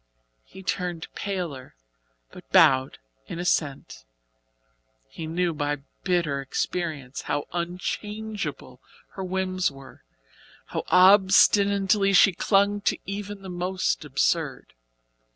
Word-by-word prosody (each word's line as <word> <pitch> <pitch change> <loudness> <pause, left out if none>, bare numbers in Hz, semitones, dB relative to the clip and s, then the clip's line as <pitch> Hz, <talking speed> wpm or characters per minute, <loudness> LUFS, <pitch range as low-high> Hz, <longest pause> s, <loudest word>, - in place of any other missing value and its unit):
He 190 - -13
turned 180 -3 -3
paler, 175 - -5 0.6
but - - -14
bowed 130 - +5 0.3
in - - -6
assent. 145 - -2 1.0
He 155 - -8
knew 170 +1 0
by 145 -2 -3 0.2
bitter 170 -7 0
experience 140 -1 -3
how 145 - -1
unchangeable 205 +5 -5 0.3
her 190 - -7
whims 185 0 -1
were, 135 -1 -14 0.6
how - - -5
obstinately 195 +2 +5
she 195 0 +6
clung 200 +2 +2
to - - 0
even 200 0 -6
the - - -8
most 180 0 -1
absurd. 145 -1 -1
180 Hz, 100 wpm, -25 LUFS, 145-195 Hz, 1.0 s, she